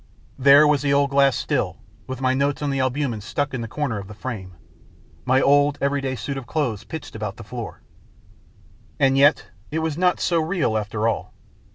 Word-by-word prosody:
There 140 Hz, +3 st, +7 dB
was 150 Hz, -2 st, +3 dB
the 140 Hz, -1 st, 0 dB
old 140 Hz, 0 st, +2 dB
glass 140 Hz, -1 st, +4 dB
still, -, -, -1 dB, 0.3 s
with 130 Hz, 0 st, -6 dB
my 130 Hz, 0 st, +2 dB
notes 140 Hz, +2 st, 0 dB
on 145 Hz, -, 0 dB
the 135 Hz, -, -1 dB
albumens 130 Hz, -4 st, -1 dB
stuck 145 Hz, +6 st, -2 dB
in 125 Hz, -, -3 dB
the 115 Hz, -, -4 dB
corner 120 Hz, -3 st, -2 dB
of 100 Hz, -, -9 dB
the 105 Hz, -, -10 dB
frame, 100 Hz, -6 st, -6 dB, 0.7 s
my 130 Hz, +1 st, +3 dB
old 145 Hz, +1 st, +3 dB
everyday 140 Hz, -1 st, -1 dB
suit 135 Hz, +2 st, -4 dB
of 130 Hz, -3 st, -7 dB
clothes 125 Hz, -9 st, -2 dB
pitched 160 Hz, -7 st, -8 dB
about 105 Hz, -2 st, -5 dB
the 115 Hz, -, -9 dB
floor. 115 Hz, +1 st, -7 dB, 1.2 s
And 135 Hz, 0 st, +4 dB
yet 140 Hz, +3 st, +3 dB, 0.2 s
it 155 Hz, -, -3 dB
was 160 Hz, 0 st, -2 dB
not 180 Hz, 0 st, +2 dB
so 170 Hz, -2 st, +1 dB
real 160 Hz, -, 0 dB
after 105 Hz, +1 st, -1 dB
all. 115 Hz, -, -3 dB
135 Hz, 195 wpm, -23 LUFS, 115-145 Hz, 1.2 s, There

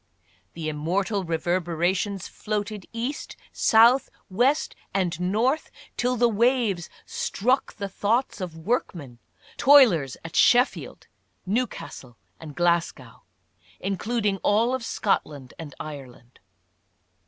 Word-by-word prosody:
The 165 Hz, -2 st, -5 dB
immortal 185 Hz, +7 st, -1 dB
reverberations 175 Hz, +3 st, -1 dB
floated 210 Hz, -2 st, -4 dB
east, 240 Hz, +5 st, -5 dB, 0.2 s
south, 235 Hz, +4 st, +5 dB, 0.2 s
west 250 Hz, +9 st, +1 dB, 0.2 s
and 175 Hz, -4 st, 0 dB
north, 225 Hz, -, 0 dB, 0.3 s
till 250 Hz, +1 st, 0 dB
the 240 Hz, 0 st, +3 dB
waves 230 Hz, -5 st, +1 dB, 0.2 s
struck 255 Hz, +6 st, -1 dB
the 200 Hz, -2 st, -4 dB
thoughts 215 Hz, +4 st, -1 dB
of 170 Hz, -3 st, -6 dB
workmen 160 Hz, -, -3 dB, 0.2 s
— -, -, -26 dB
toilers 205 Hz, -, +6 dB
at 165 Hz, -, -8 dB
Sheffield, 245 Hz, +2 st, +2 dB, 0.4 s
Newcastle 190 Hz, -, -4 dB, 0.2 s
and 150 Hz, -3 st, -10 dB
Glasgow, 170 Hz, -8 st, -1 dB, 0.6 s
including 205 Hz, +1 st, -1 dB
all 220 Hz, +6 st, +2 dB
of 260 Hz, -2 st, -2 dB
Scotland 145 Hz, -, -2 dB
and 150 Hz, -4 st, -8 dB
Ireland. 130 Hz, -5 st, -10 dB
195 Hz, 105 wpm, -25 LUFS, 165-235 Hz, 0.6 s, toilers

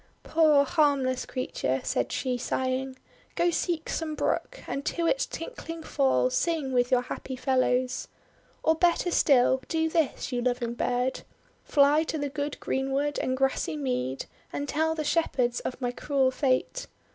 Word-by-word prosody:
"Poor, 305 Hz, -3 st, +4 dB
harmless 280 Hz, -5 st, +1 dB
creature," 135 Hz, -, -2 dB
said -, -, -1 dB
she, 255 Hz, -2 st, -1 dB
sighing, 260 Hz, +1 st, -2 dB, 0.4 s
"go 345 Hz, 0 st, +2 dB
seek 335 Hz, -1 st, -1 dB
some 315 Hz, -2 st, -2 dB
brook, -, -, -2 dB
and 275 Hz, -, -3 dB
to 335 Hz, +3 st, -1 dB
its -, -, +1 dB
tinkling 330 Hz, -9 st, -7 dB
fall 265 Hz, -4 st, +2 dB
sing 290 Hz, 0 st, 0 dB
with 245 Hz, 0 st, +2 dB
your 250 Hz, -1 st, +3 dB
happy 260 Hz, +1 st, -6 dB
fellows. 255 Hz, -1 st, +1 dB, 0.6 s
Or 320 Hz, -, +4 dB
better 345 Hz, +2 st, +2 dB
still, 260 Hz, -4 st, +4 dB
do 320 Hz, 0 st, 0 dB
this, 315 Hz, -4 st, 0 dB
you 245 Hz, -1 st, -1 dB
loving 245 Hz, -1 st, -1 dB
bird: 250 Hz, +2 st, -1 dB, 0.4 s
fly 290 Hz, +1 st, +4 dB
to 315 Hz, -, -2 dB
the 285 Hz, -1 st, -2 dB
good 285 Hz, +1 st, -4 dB
greenwood 270 Hz, +2 st, -1 dB
and 255 Hz, 0 st, -1 dB
grassy 270 Hz, -, 0 dB
mead, 130 Hz, -1 st, -2 dB, 0.3 s
and 285 Hz, -, -3 dB
tell 320 Hz, +2 st, 0 dB
the 310 Hz, -, -2 dB
Shepherds 255 Hz, -6 st, +1 dB
of 255 Hz, -, -5 dB
my 245 Hz, -2 st, -1 dB
cruel 265 Hz, +1 st, +1 dB
fate. 270 Hz, -, 0 dB
270 Hz, 155 wpm, -27 LUFS, 255-315 Hz, 0.6 s, Poor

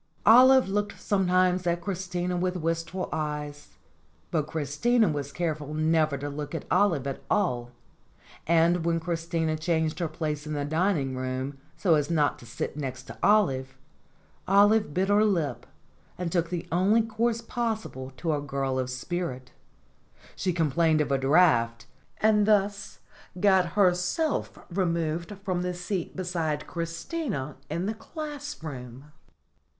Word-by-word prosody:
Olive 255 Hz, +3 st, +7 dB
looked 205 Hz, +1 st, -2 dB
sometimes 185 Hz, -2 st, +2 dB
at 170 Hz, 0 st, +1 dB
Christina 180 Hz, -1 st, -3 dB
with 180 Hz, +1 st, -1 dB
wistful 165 Hz, +2 st, -2 dB
eyes, 150 Hz, -1 st, -5 dB, 0.5 s
but 150 Hz, -2 st, 0 dB
Christina 160 Hz, -, +1 dB
was 145 Hz, -2 st, -2 dB
careful 155 Hz, -2 st, -3 dB
never 155 Hz, -2 st, +2 dB
to 145 Hz, +2 st, -5 dB
look 145 Hz, +2 st, -5 dB
at -, -, -5 dB
Olive 170 Hz, -10 st, +3 dB
at 135 Hz, -1 st, -4 dB
all, 125 Hz, -12 st, 0 dB, 0.8 s
and 170 Hz, +1 st, +3 dB
when 165 Hz, 0 st, +1 dB
Christina 165 Hz, -2 st, -1 dB
changed 160 Hz, 0 st, 0 dB
her 170 Hz, -, 0 dB
place 155 Hz, -1 st, -4 dB
in 155 Hz, -, -3 dB
the 145 Hz, -1 st, -2 dB
dining 155 Hz, -3 st, 0 dB
hall 130 Hz, +1 st, -3 dB, 0.3 s
so 180 Hz, -5 st, +3 dB
as 150 Hz, -2 st, +2 dB
not 150 Hz, -4 st, +1 dB
to 120 Hz, -, -13 dB
sit 120 Hz, -, -4 dB
next 130 Hz, -3 st, -5 dB
to -, -, -11 dB
Olive, 135 Hz, -11 st, +2 dB, 0.7 s
Olive 205 Hz, +1 st, +4 dB
bit 185 Hz, +5 st, 0 dB
her 205 Hz, +1 st, +5 dB
lip 165 Hz, -, 0 dB, 0.5 s
and 175 Hz, -2 st, -3 dB
took 170 Hz, -1 st, 0 dB
the 175 Hz, -1 st, -4 dB
only 195 Hz, +6 st, +3 dB
course 225 Hz, +1 st, -1 dB
possible 220 Hz, -, -3 dB
to 165 Hz, -2 st, -1 dB
a 145 Hz, -, -1 dB
girl 135 Hz, -2 st, -2 dB
of 130 Hz, -1 st, -2 dB
spirit; 130 Hz, -1 st, -4 dB, 0.8 s
she 185 Hz, -, -1 dB
complained 160 Hz, -1 st, +2 dB
of 145 Hz, -2 st, -1 dB
a 135 Hz, -, +2 dB
draught, 130 Hz, -6 st, +3 dB, 0.3 s
and 210 Hz, -1 st, +3 dB
thus 205 Hz, -1 st, +1 dB, 0.4 s
got 190 Hz, -3 st, +3 dB
herself 190 Hz, -, +1 dB
removed 170 Hz, 0 st, -1 dB
from 185 Hz, -3 st, -1 dB
the 180 Hz, 0 st, -2 dB
seat 180 Hz, 0 st, -4 dB
beside 165 Hz, -5 st, -2 dB
Christina 170 Hz, -, -4 dB
in 170 Hz, +4 st, -2 dB
the 215 Hz, -, -1 dB
classroom. 160 Hz, -, -7 dB
170 Hz, 140 wpm, -27 LUFS, 150-190 Hz, 0.8 s, Olive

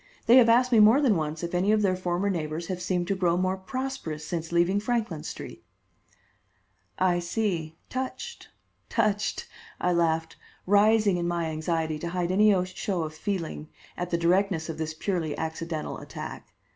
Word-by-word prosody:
They 240 Hz, +2 st, +7 dB
have 235 Hz, -3 st, +7 dB
asked 250 Hz, +2 st, +4 dB
me 230 Hz, -, +6 dB
more 220 Hz, +6 st, +7 dB
than 260 Hz, -8 st, +3 dB
once 155 Hz, 0 st, -3 dB
if 170 Hz, -, -4 dB
any 185 Hz, +4 st, +2 dB
of 215 Hz, -1 st, +3 dB
their 185 Hz, -2 st, +2 dB
former 180 Hz, +1 st, -1 dB
neighbors 160 Hz, -1 st, -3 dB
have 180 Hz, -1 st, -3 dB
seemed 180 Hz, -1 st, -1 dB
to 195 Hz, -, +2 dB
grow 175 Hz, -2 st, +1 dB
more 185 Hz, +1 st, +1 dB
prosperous 190 Hz, -, -5 dB
since 165 Hz, 0 st, -4 dB
leaving 175 Hz, +4 st, +3 dB
Franklin 215 Hz, -7 st, -1 dB
Street." -, -, -8 dB, 1.3 s
"I 180 Hz, -1 st, +2 dB
see; 175 Hz, -3 st, -2 dB
touched, 260 Hz, -, -5 dB, 0.4 s
touched!" 210 Hz, 0 st, 0 dB, 0.3 s
I 180 Hz, -, +1 dB
laughed, 165 Hz, -1 st, 0 dB, 0.3 s
rising 205 Hz, 0 st, +4 dB
in 170 Hz, 0 st, -1 dB
my 170 Hz, -2 st, -1 dB
anxiety 160 Hz, 0 st, -1 dB
to 170 Hz, -, -4 dB
hide 175 Hz, 0 st, -1 dB
any 195 Hz, -1 st, +4 dB
show 185 Hz, -1 st, -3 dB
of 155 Hz, 0 st, -5 dB
feeling 160 Hz, -3 st, -4 dB, 0.3 s
at 175 Hz, 0 st, -4 dB
the 170 Hz, -, +1 dB
directness 175 Hz, -1 st, +1 dB
of 160 Hz, -1 st, -5 dB
this 155 Hz, 0 st, -3 dB
purely 165 Hz, -3 st, -2 dB
accidental 160 Hz, 0 st, -4 dB
attack. -, -, -8 dB
180 Hz, 170 wpm, -27 LUFS, 165-205 Hz, 1.3 s, They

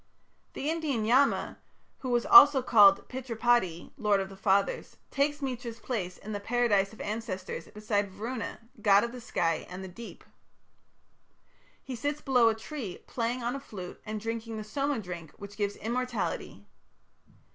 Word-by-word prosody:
The 280 Hz, -, -4 dB
Indian 305 Hz, -8 st, -1 dB
Yama, 260 Hz, +5 st, +2 dB, 0.4 s
who 260 Hz, -, -5 dB
was 240 Hz, -1 st, +1 dB
also 290 Hz, -9 st, +9 dB
called 205 Hz, -5 st, +6 dB
Pitripati, 240 Hz, -8 st, 0 dB
"lord 210 Hz, -3 st, +3 dB
of 195 Hz, 0 st, -3 dB
the 195 Hz, -, -11 dB
fathers", 195 Hz, 0 st, 0 dB
takes 290 Hz, +1 st, 0 dB
Mitra's 245 Hz, -3 st, -4 dB
place 190 Hz, -9 st, -4 dB
in 215 Hz, -, -9 dB
the 205 Hz, -, -3 dB
Paradise 205 Hz, -3 st, +1 dB
of 220 Hz, -, -15 dB
Ancestors 205 Hz, -6 st, -5 dB
beside 210 Hz, -1 st, -1 dB
Varuna, 225 Hz, +6 st, -5 dB, 0.2 s
god 200 Hz, -1 st, +5 dB
of 235 Hz, -, -3 dB
the 250 Hz, 0 st, -9 dB
sky 165 Hz, -7 st, -1 dB
and 180 Hz, +1 st, -7 dB
the -, -, -6 dB
deep. 225 Hz, +6 st, -11 dB, 1.6 s
He 260 Hz, -, -6 dB
sits 290 Hz, +5 st, -2 dB
below 250 Hz, -5 st, +4 dB
a 220 Hz, -, 0 dB
tree, 225 Hz, -, -6 dB
playing 240 Hz, +1 st, -2 dB
on 240 Hz, +3 st, -1 dB
a -, -, -4 dB
flute 195 Hz, -9 st, -9 dB
and 215 Hz, 0 st, -4 dB
drinking 225 Hz, +1 st, -4 dB
the 215 Hz, -, -5 dB
Soma 275 Hz, +6 st, -1 dB
drink 175 Hz, -5 st, -8 dB
which 200 Hz, 0 st, -10 dB
gives 205 Hz, -1 st, -1 dB
immortality. 245 Hz, +2 st, -3 dB
225 Hz, 155 wpm, -29 LUFS, 200-250 Hz, 1.6 s, also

